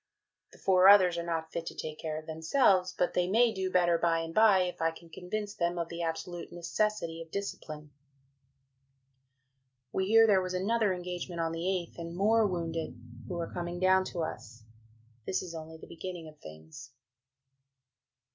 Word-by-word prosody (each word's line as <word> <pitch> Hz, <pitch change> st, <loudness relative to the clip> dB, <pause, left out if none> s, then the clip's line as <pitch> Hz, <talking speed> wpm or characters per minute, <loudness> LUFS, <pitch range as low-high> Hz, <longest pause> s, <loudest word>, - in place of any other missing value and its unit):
The -, -, -17 dB
four 185 Hz, -1 st, +4 dB
others 190 Hz, -3 st, +7 dB
are -, -, -3 dB
not 165 Hz, -1 st, -3 dB
fit 165 Hz, 0 st, -4 dB
to -, -, -6 dB
take 155 Hz, -1 st, -6 dB
care 155 Hz, -1 st, -4 dB
of 155 Hz, -, -8 dB
themselves, 180 Hz, -, +2 dB
but 180 Hz, -, +1 dB
they 180 Hz, 0 st, +1 dB
may 230 Hz, +3 st, +4 dB
do 190 Hz, -2 st, -2 dB
better 175 Hz, -2 st, +3 dB
by 165 Hz, -1 st, +2 dB
and 165 Hz, 0 st, -6 dB
bye 215 Hz, -2 st, +5 dB
if 180 Hz, -2 st, -5 dB
I 165 Hz, -, +3 dB
can 165 Hz, 0 st, -13 dB
convince 205 Hz, +5 st, -5 dB
them 175 Hz, -2 st, -1 dB
of 170 Hz, -1 st, -3 dB
the 170 Hz, 0 st, -5 dB
absolute 170 Hz, +1 st, -4 dB
necessity 175 Hz, -1 st, -2 dB
of 165 Hz, -, -10 dB
discipline. 155 Hz, -6 st, -6 dB, 2.0 s
We 190 Hz, 0 st, -1 dB
hear 225 Hz, +2 st, +7 dB
there 200 Hz, -4 st, +4 dB
was 185 Hz, 0 st, -3 dB
another 210 Hz, +2 st, +1 dB
engagement 180 Hz, -1 st, -5 dB
on 165 Hz, 0 st, 0 dB
the 165 Hz, -, -4 dB, 0.4 s
8th -, -, -12 dB
and 170 Hz, 0 st, -6 dB
more 215 Hz, +2 st, +4 dB
wounded, 165 Hz, -6 st, -4 dB, 0.3 s
who 180 Hz, -, -4 dB
are 170 Hz, -1 st, -4 dB
coming 175 Hz, 0 st, -4 dB
down 185 Hz, 0 st, +4 dB
to 175 Hz, -3 st, -3 dB
us. 120 Hz, -7 st, -7 dB, 0.6 s
This 190 Hz, -, -1 dB
is 175 Hz, -2 st, -8 dB
only 160 Hz, 0 st, -8 dB
the -, -, -12 dB
beginning 175 Hz, -1 st, -7 dB
of 155 Hz, -1 st, -14 dB
things. 80 Hz, -, -12 dB
175 Hz, 180 wpm, -30 LUFS, 165-190 Hz, 2.0 s, others